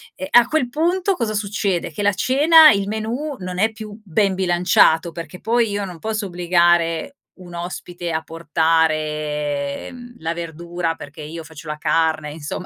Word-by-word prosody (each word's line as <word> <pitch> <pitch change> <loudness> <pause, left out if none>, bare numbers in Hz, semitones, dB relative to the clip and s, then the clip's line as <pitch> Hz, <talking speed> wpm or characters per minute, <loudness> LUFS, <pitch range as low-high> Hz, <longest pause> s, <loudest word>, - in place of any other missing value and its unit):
ehm, 280 - -6
a 240 -1 +7
quel 260 -3 0
punto 350 +7 +1
cosa 230 -8 -2
succede, 200 -4 -1
che 205 - -4
la 205 - +4
cena 305 - +6
il 200 -1 0
menù 230 +8 -3
non 180 -1 -6
è 220 +3 +2
più 215 -1 -10
ben 195 +1 +1
bilanciato, 175 -2 +3
perché 165 +1 -8
poi 230 0 +1
io 205 0 -2
non 180 -3 -9
posso 215 +2 -3
obbligare 175 - +1 0.2
un 180 -2 -13
ospite 175 0 -6
a 160 0 -1
portare 155 -3 -1
mhmm, 245 -1 -12
la 165 +1 -3
verdura 170 0 -4
perché 155 0 -11
io 160 +2 -7
faccio 160 0 -12
la 150 - -4
carne 155 -1 0
insomma 150 +3 -6
175 Hz, 165 wpm, -20 LUFS, 160-215 Hz, 0.2 s, a